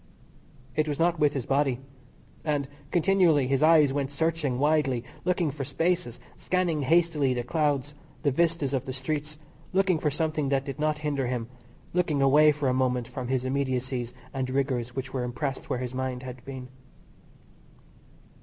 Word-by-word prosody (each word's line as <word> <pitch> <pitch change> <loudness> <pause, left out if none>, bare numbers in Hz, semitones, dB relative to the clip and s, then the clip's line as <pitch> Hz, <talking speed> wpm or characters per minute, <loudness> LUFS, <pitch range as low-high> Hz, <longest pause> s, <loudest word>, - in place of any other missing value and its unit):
It 155 0 +1
was 145 -2 -2
not 170 +1 +2
with 150 -1 +3
his 135 -4 -3
body. 135 -2 +1 0.6
And 145 -3 0 0.2
continually 175 -4 +4
his 135 +1 +1
eyes 155 -3 +6
went 140 -1 -1
searching 150 -3 0
widely, 140 -4 +2 0.2
looking 175 -4 +1
for 140 0 -5
spaces, 165 -1 -1 0.2
scanning 180 -4 0
hastily 150 -3 +3
the 120 - -1
clouds, 145 0 0 0.3
the 145 - +3
vistas 160 -2 +1
of 135 -1 -1
the 130 - -4
streets, 150 +3 -3 0.4
looking 190 -3 +3
for 150 - +1
something 155 -1 -1
that 135 -1 +1
did 140 +1 -6
not 155 0 +1
hinder 140 -3 0
him, 120 -2 -3 0.4
looking 170 -5 +1
away 145 +3 +6
for 145 -2 -2
a 130 - +2
moment 125 -2 +1
from 125 0 -5
the 130 - +1
immediacies 130 -2 -1 0.2
and 130 -2 -2
rigours 130 -3 -1
which 130 0 -4
were 130 -2 -1
impressed 135 +2 -3
where - - 0
his 125 0 -4
mind 130 -1 -3
had 125 -1 -8
been. 130 -2 -7
140 Hz, 165 wpm, -27 LUFS, 130-155 Hz, 0.6 s, eyes